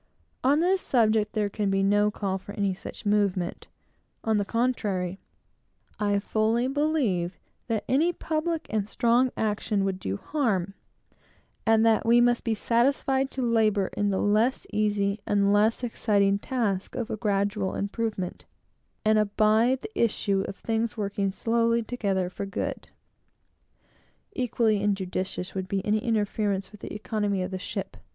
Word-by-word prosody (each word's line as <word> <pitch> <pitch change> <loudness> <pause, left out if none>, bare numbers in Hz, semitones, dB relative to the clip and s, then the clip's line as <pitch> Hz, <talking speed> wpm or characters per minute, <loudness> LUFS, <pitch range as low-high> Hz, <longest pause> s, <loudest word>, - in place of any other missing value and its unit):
On 285 +4 +4
this 370 +2 +2
subject 220 -3 +2
there 210 -2 +1
can 205 0 -2
be 195 0 +1
no 205 +1 +3
call 195 -2 -2
for 200 - -10
any 200 -2 0
such 185 - -9
movement; 200 -3 0 0.6
on 220 -1 +2
the 205 - 0
contrary, 200 -6 -1 0.8
I 205 -1 +2
fully 220 +4 +1
believe 265 - 0 0.3
that 225 -3 -1
any 310 +7 +3
public 320 0 -2
and 215 -1 -1
strong 240 +3 +3
action 210 -1 0
would 190 -1 -2
do 95 - -3
harm, 200 - -1 0.9
and 225 0 +5
that 225 -1 +4
we 235 +1 +5
must 240 0 +3
be 225 -2 0
satisfied 265 +4 +1
to 265 - -3
labor 215 -4 +2
in 205 0 +1
the 195 - 0
less 215 +6 +2
easy 205 -1 +1
and 200 0 +3
less 215 +4 +2
exciting 200 -4 +1
task 205 -6 -2
of 240 -2 -3
gradual 200 -2 0
improvement, 200 -2 -3 0.6
and 215 0 +4
abide 215 +5 +2
the 440 - -4
issue 200 -3 +1
of - - -6
things 225 +2 -2
working 200 -1 -1
slowly 230 +2 +1
together 200 -6 -1
for 190 +2 -5
good. 195 - -4 1.5
Equally 230 -4 +1
injudicious 190 -2 -2
would 190 -1 -3
be 195 0 -2
any 215 +1 +2
interference 210 -3 -1
with 210 - -14
the - - -7
economy 210 -2 -1
of 185 - -5
the 185 - -4
ship. - - -5
210 Hz, 145 wpm, -27 LUFS, 200-235 Hz, 1.5 s, and